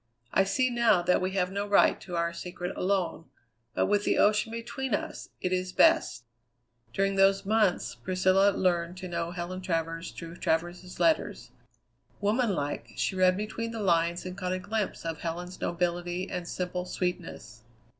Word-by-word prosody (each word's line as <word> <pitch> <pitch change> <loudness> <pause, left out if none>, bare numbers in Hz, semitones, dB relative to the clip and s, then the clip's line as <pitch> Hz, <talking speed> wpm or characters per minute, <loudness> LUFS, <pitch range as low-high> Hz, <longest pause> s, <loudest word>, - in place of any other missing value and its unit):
I 195 - +4
see 255 +6 +1
now 230 -7 +3
that 180 +1 +3
we 185 +1 -1
have 185 -1 0
no 200 +1 -2
right 205 - +4
to 180 - -6
our 170 0 0
secret 180 +1 -5
alone; 185 -3 -1 0.5
but - - +2
with 205 0 +2
the - - +1
ocean 210 +2 +3
between 230 +1 -2
us, - - -6
it 185 0 0
is 185 0 -1
best." 325 - +4 0.7
During 195 +4 0
those 195 0 +4
months 210 -3 +2
Priscilla 185 +1 +3
learned 175 -2 0
to 185 0 -6
know 170 -1 -2
Helen 180 +1 -5
Travers 165 -1 -2
through 165 0 -9
Travers's 175 +3 -2
letters. 325 -2 +1 0.7
Woman 210 +1 +1
like, 145 -1 -4
she 190 - -1
read 185 0 +4
between 220 +2 -3
the 230 0 -5
lines 170 -1 +2
and 185 0 -5
caught 185 -1 -2
a - - 0
glimpse 210 -1 -3
of 165 -1 -3
Helen's 175 +2 -5
nobility 175 +1 -1
and 180 -2 -5
simple 180 0 -3
sweetness. 180 -10 -4
185 Hz, 165 wpm, -29 LUFS, 175-200 Hz, 0.7 s, I